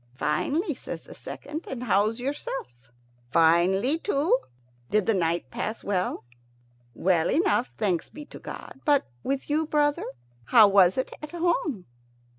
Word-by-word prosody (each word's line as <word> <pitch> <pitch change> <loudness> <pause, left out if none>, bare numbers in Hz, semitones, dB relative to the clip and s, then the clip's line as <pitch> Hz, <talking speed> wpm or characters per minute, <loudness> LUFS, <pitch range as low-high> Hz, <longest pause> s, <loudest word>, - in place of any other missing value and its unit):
"Finely," 285 - 0
says - - -7
the - - -12
second; 305 +3 -7
"and 250 -2 -5
how's 215 0 +2
yourself?" 130 - -5 0.4
"Finely 185 - +3
too. 305 -5 +2 0.5
Did 210 -2 +2
the 225 - +3
night 170 -7 -1
pass 220 - -4
well?" 185 -7 -1 0.7
"Well 175 -3 +2
enough, 330 -7 +2
thanks 190 -6 0
be 300 0 -10
to - - -12
God. 270 - -9
But 290 -2 +3 0.2
with 275 0 -2
you, 310 +1 0
brother? 295 -1 +1 0.4
How 220 - +7
was 190 -2 +5
it 260 - -2
at 300 - -7
home?" 335 - 0
235 Hz, 140 wpm, -26 LUFS, 185-295 Hz, 0.7 s, How